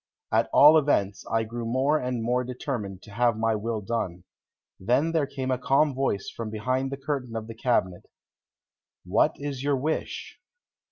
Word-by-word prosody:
At - - +2
all 155 +2 +8
events, 100 -9 0
I 115 0 +2
grew 115 +2 -5
more 130 +6 +1
and 125 -3 -2
more 125 +2 +1
determined 120 - -5
to 105 - -13
have 120 0 +2
my 115 0 +1
will 110 +1 -2
done. 95 -5 -3 0.6
Then 125 +11 +2
there 160 -4 +1
came 135 -2 -3
a 125 - 0
calm 135 +4 +3
voice 130 -7 -1
from 115 -2 -5
behind 130 +5 -1
the 140 - -4
curtain 135 -4 -4
of 110 -1 -3
the 115 - -8
cabinet. 110 -6 0 1.0
"What - - +3
is 140 -2 -5
your 140 0 +1
wish?" 155 +5 -3
125 Hz, 170 wpm, -26 LUFS, 110-135 Hz, 1.0 s, all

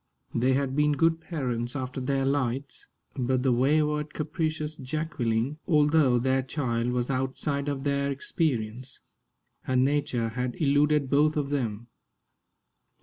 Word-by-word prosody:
They 125 +3 +2
had 135 0 0
been 150 0 +3
good 165 +2 +2
parents 125 -7 -3
after 130 -1 -4
their 135 +1 0
lights, 135 -1 -2 0.3
but 130 -1 0
the 130 - +3
wayward, 150 +4 +1
capricious 155 -1 -2
Jacqueline, 135 -2 -2
although 150 -5 +4
their 130 +2 +2
child, 125 -3 -2
was 125 +1 -1
outside 135 +2 -1
of 135 -2 -3
their 140 0 0
experience. 130 -4 -2 0.6
Her 130 - -2
nature 130 -3 +1
had 125 +1 -3
eluded 145 -1 +2
both 150 +2 +3
of 140 -1 -1
them. 120 -6 -2
140 Hz, 130 wpm, -27 LUFS, 125-150 Hz, 0.6 s, although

